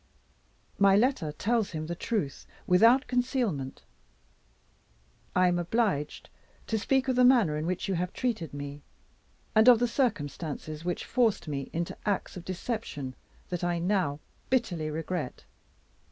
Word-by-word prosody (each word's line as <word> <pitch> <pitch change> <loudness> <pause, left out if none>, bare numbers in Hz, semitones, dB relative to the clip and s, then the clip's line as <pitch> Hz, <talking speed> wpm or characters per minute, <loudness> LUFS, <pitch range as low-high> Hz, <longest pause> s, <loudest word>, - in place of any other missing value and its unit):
My 200 -1 +6
letter 210 - +2
tells 220 +7 0
him 155 -1 -3
the 170 - -3
truth, 180 - -3 0.2
without 230 +9 +5
concealment. 245 - -1 1.5
I 185 0 +5
am 175 0 +2
obliged 175 -5 -1 0.3
to 220 - -1
speak 265 +4 +1
of 260 - +1
the 250 - +5
manner 240 -11 +5
in 155 +2 -2
which 180 0 -2
you 195 - 0
have 180 +1 -1
treated 220 - -2
me, 145 0 -7 0.7
and 220 +2 +5
of 245 - +8
the 245 +2 +1
circumstances 155 - -2
which 175 0 -2
forced 230 -8 +1
me 140 -2 -4
into 170 +1 -3
acts 205 -2 -1
of 180 - -7
deception 185 - -4 0.4
that 175 -1 -3
I 175 0 +1
now 170 -5 0 0.3
bitterly 190 -12 0
regret. 160 -2 -4
180 Hz, 140 wpm, -29 LUFS, 155-230 Hz, 1.5 s, of